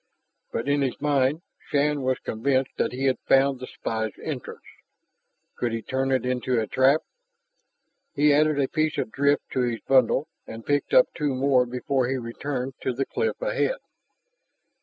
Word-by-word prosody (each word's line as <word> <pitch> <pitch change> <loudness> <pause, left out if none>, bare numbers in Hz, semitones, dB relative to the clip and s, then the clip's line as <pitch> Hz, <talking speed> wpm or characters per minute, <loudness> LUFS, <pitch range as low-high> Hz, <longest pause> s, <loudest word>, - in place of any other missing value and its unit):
But 115 - -3
in 145 0 +2
his 130 -2 -1
mind 145 +2 +1 0.3
Shann 145 0 +1
was 130 -1 0
convinced 130 +3 -1
that - - 0
he 130 +2 -3
had 130 -1 +2
found 135 0 +4
the 130 - -7
spy's 110 -1 -3
entrance. 140 -6 -6 0.9
Could 120 -2 -2
he 115 -1 -3
turn 135 0 -1
it 130 -2 +1
into 125 -1 0
a 110 - 0
trap? 130 +7 +3 1.1
He 150 0 +4
added 150 0 +3
a 135 - +2
piece 155 +1 -1
of - - -2
drift 140 +1 +2
to - - -1
his 120 -2 -1
bundle 135 +2 +3 0.2
and 115 0 -9
picked 145 - 0
up - - +5
two 145 -3 -1
more 130 -1 +3
before 125 +1 -1
he 135 +1 -1
returned 130 +2 -4
to 130 - -1
the 135 +3 -1
cliff 460 0 -2
ahead. - - 0
135 Hz, 170 wpm, -25 LUFS, 125-145 Hz, 1.1 s, up